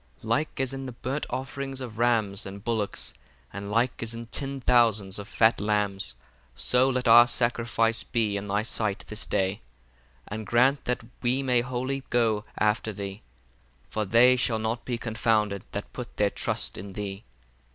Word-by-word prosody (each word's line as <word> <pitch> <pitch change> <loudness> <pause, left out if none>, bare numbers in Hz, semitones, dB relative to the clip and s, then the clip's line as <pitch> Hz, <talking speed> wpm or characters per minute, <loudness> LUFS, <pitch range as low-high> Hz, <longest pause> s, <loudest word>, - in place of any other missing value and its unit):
17 110 - -8
Like 145 +7 0
as 135 0 0
in 135 0 -5
the 125 - -6
burnt 130 +4 -3
offerings 135 0 -4
of 115 -4 -7
rams 110 -6 +1
and 100 +1 -9
bullocks, 110 -4 -2 0.4
and 100 +1 -6
like 115 +4 +1
as 115 0 -3
in 115 0 -6
ten 135 +3 -3
thousands 110 -6 +3
of 100 - -7
fat 110 +1 +3
lambs: 100 - 0 0.4
so 125 +2 +3
let 125 -1 0
our 120 +1 +9
sacrifice 115 -1 +1
be 110 -4 0
in 100 0 -3
thy 105 +2 +1
sight 110 -3 -2
this 110 0 -3
day, 95 +1 0 0.7
and 105 +1 -5
grant 130 +4 +3
that 125 -2 -1 0.2
we 130 +2 +1
may 125 -2 +3
wholly 130 +2 -2
go 115 -3 +2
after 105 +1 +1
thee: 100 0 -6 0.7
for 110 - -1
they 115 +5 +6
shall 125 -2 +1
not 110 +2 -2
be 120 -2 -2
confounded 110 -3 +1
that 100 - -5
put 125 -2 -7
their 100 -1 +2
trust - - -2
in 100 +1 -8
thee. 100 0 -5
115 Hz, 170 wpm, -27 LUFS, 105-125 Hz, 0.7 s, our